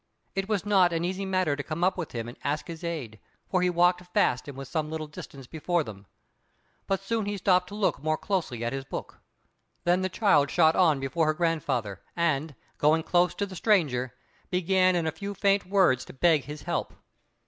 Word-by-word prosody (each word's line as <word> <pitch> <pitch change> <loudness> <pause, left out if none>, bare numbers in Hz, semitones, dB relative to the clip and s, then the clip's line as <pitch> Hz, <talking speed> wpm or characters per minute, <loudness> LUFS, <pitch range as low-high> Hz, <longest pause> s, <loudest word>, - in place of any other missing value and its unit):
It 195 +1 -2
was 205 -2 0
not 190 -4 +4
an 165 +1 0
easy 190 +2 -3
matter 185 -6 +1
to 145 - -4
come 155 +3 -4
up 185 +1 +3
with 175 -4 -5
him 115 -1 -4
and 120 - -8
ask 145 +2 -1
his 165 0 -8
aid, 140 -11 -4 0.3
for 185 -2 +1
he 180 - +3
walked 180 +1 +3
fast, 125 +3 +2
and 140 -2 -8
was 135 -1 -7
some 155 +2 -2
little 160 0 -4
distance 140 -2 -10
before 165 +4 -1
them. 100 -4 -10 0.8
But 195 -1 0
soon 220 0 -1
he 205 0 -2
stopped 185 -1 +3
to 205 - -8
look 210 -9 0
more 155 +1 0
closely 155 - -2
at 120 - -2
his 135 0 -3
book. 135 - -7 0.6
Then 175 +1 +2
the 185 - 0
child 175 -9 +3
shot 160 -2 +4
on 160 -6 +4
before 135 +4 0
her 155 - +2
grandfather, 140 - -1
and, 155 -3 0 0.2
going 155 +2 +3
close 175 +1 +2
to 200 - -1
the 190 -2 -10
stranger, 145 - +1 0.3
began 185 0 +3
in 170 -2 0
a 160 - 0
few 200 +4 -6
faint 200 -1 +2
words 185 -10 +3
to - - -11
beg 155 0 +3
his 150 +2 -8
help. - - -3
170 Hz, 210 wpm, -27 LUFS, 145-185 Hz, 0.8 s, not